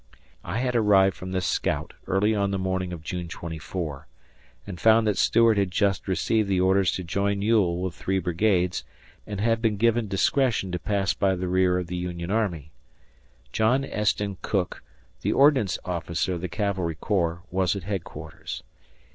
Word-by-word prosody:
I 95 - -4
had 125 0 -1
arrived 100 -4 +4
from 90 0 -7
this 95 -1 -1
scout - - -1
early 105 +3 +2
on 100 -2 +1
the 100 - -1
morning 95 -1 -2
of 85 -3 -7
June 90 +1 -4
24, 80 -3 -6 0.6
and 95 -4 -7
found 110 0 +5
that 105 -2 +2
Stuart 115 +2 +4
had 100 -2 +1
just 100 +1 0
received 100 +3 +1
the 95 -2 +2
orders 95 0 +3
to 95 - -3
join 100 +3 -1
Ewell 100 -6 +2
with 95 -2 -2
three 95 +1 -2
brigades 90 0 +1 0.4
and 105 -2 -5
had 115 +2 +1
been 110 -3 +1
given 115 +1 +2
discretion 105 0 +1
to 90 - -2
pass 100 0 0
by 95 -1 +1
the 90 0 -3
rear 90 0 +2
of 90 - -2
the 90 +1 -5
Union 90 0 -4
army. 85 -9 -1 0.8
John 125 - +2
Esten 105 -4 -1
Cooke, 95 -4 -2 0.4
the - - 0
Ordnance 135 - +4
Officer 85 0 -2
of 85 - -4
the 90 - -3
cavalry 95 -3 -1
corps, 85 -1 -1
was 95 0 +1
at 100 - -5
headquarters. 95 -2 -6
95 Hz, 170 wpm, -25 LUFS, 90-105 Hz, 0.8 s, found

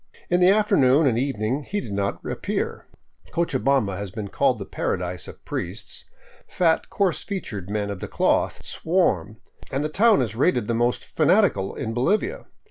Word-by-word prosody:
In 175 - +4
the 180 0 +6
afternoon 160 -9 +4
and 120 -4 +2
evening 130 0 -1
he 205 +7 -3
did 150 - -7
not 100 0 -2
appear. - - -3 0.4
Cochabamba 135 - +1
has 100 0 -5
been 100 +1 -6
called - - +2
the - - -6
paradise 90 0 -3
of - - -12
priests. 105 +5 -5 0.4
Fat, 165 -3 +1
coarse 195 -5 0
featured 105 - -5
men 105 -1 -2
of 100 - -6
the - - -5
cloth - - 0
swarm, 110 - 0 0.3
and 135 +2 -1
the 150 - -1
town 205 - +4
is 110 -3 -4
rated 125 -4 +2
the 115 - 0
most 120 +1 +1
fanatical 160 - +2
in 110 - -3
Bolivia. 215 - 0
130 Hz, 165 wpm, -24 LUFS, -, 0.4 s, the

